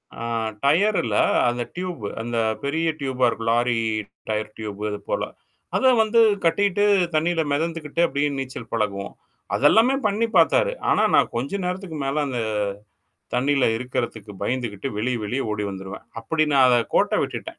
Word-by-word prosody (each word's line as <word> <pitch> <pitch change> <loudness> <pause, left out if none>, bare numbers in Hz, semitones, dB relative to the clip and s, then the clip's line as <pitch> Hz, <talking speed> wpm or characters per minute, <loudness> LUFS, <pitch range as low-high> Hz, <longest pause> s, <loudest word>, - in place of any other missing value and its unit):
ஆ - - -10 0.4
tyre 195 +9 +3
இல்ல 110 -3 -2 0.3
அந்த 120 0 -2
tube 180 - -5 0.2
அந்த 120 0 -3 0.3
பெரிய 160 +4 0
டியூபா 130 -2 0
இருக்கும். 115 0 -3
லாரி 120 0 +2 0.5
டயர் 105 0 -2
டியூப் 105 -2 -6
அது 105 - -4
போல. - - 0 0.5
அத 260 - +4
வந்து 220 +2 +2 0.3
கட்டிட்டு 200 +3 +2 0.3
தண்ணில 165 +1 +2
மிதந்துக்கிட்டு 165 +1 -2
அப்படியே 145 +1 0
நீச்சல் 130 -3 -6
பழகுவோம். 100 -3 -2 0.4
அது 140 - +1
எல்லாமே 245 +5 +4
பண்ணி 210 +3 +1
பார்த்தாரு. - - +4 0.2
ஆனா - - +3
நான் - - +3
கொஞ்ச 140 +11 -2
நேரத்துக்கு 180 -3 -4
மேல 145 +2 0
அந்த 125 -3 -3 1.0
தண்ணில 135 +2 +2
இருக்குறதுக்கு 120 -4 -4
பயந்துகிட்டு 120 -2 -2
வெளிய 125 +3 0
வெளிய 120 +6 -2
ஓடி 105 0 -2
வந்துருவேன். 95 0 -8 0.2
அப்படி 155 +7 0
நான் 135 -2 +6
அத 125 - +5 0.2
கோட்ட - - +3
விட்டுட்டேன். - - -6
135 Hz, 150 wpm, -23 LUFS, 115-165 Hz, 1.0 s, நான்